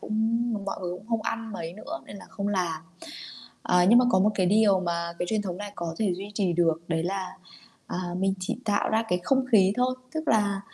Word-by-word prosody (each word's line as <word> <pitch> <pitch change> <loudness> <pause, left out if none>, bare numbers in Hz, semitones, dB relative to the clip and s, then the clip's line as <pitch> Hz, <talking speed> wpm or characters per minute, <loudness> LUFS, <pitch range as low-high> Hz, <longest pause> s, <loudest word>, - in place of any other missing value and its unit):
cũng 215 - -5 0.5
mọi 200 - -4
người 180 -1 -3
cũng 200 - -15
không 225 -2 0
ăn 225 0 -3
mấy 165 -4 -5
nữa 310 - -7
nên 200 - -9
là 195 - -11
không 200 0 -3
làm. 175 -5 -1 0.8
Ờ, 180 0 +3
nhưng 235 +3 +8
mà 250 - +5
có 190 - +4
một 205 +3 +4
cái 185 -3 +2
điều 205 -1 +4
mà 170 -1 -2
cái 175 - -1
truyền 215 -1 0
thống 180 -3 -4
này 205 +1 -7
có 170 -3 -4
thể 200 -5 +1
duy 195 +3 -7
trì 190 -3 +1
được, 165 -1 +2
đấy 165 -1 0
là, 190 +1 -3 0.5
à, - - -4 0.2
mình 190 0 +1
chỉ 185 - -2
tạo 210 -2 +1
ra 220 +1 +2
cái 180 0 +1
không 265 +5 +2
khí 195 -3 +6
thôi, 250 +1 +2 0.2
tức 315 0 -3
là, 205 -3 +2
195 Hz, 235 wpm, -27 LUFS, 180-215 Hz, 0.8 s, nhưng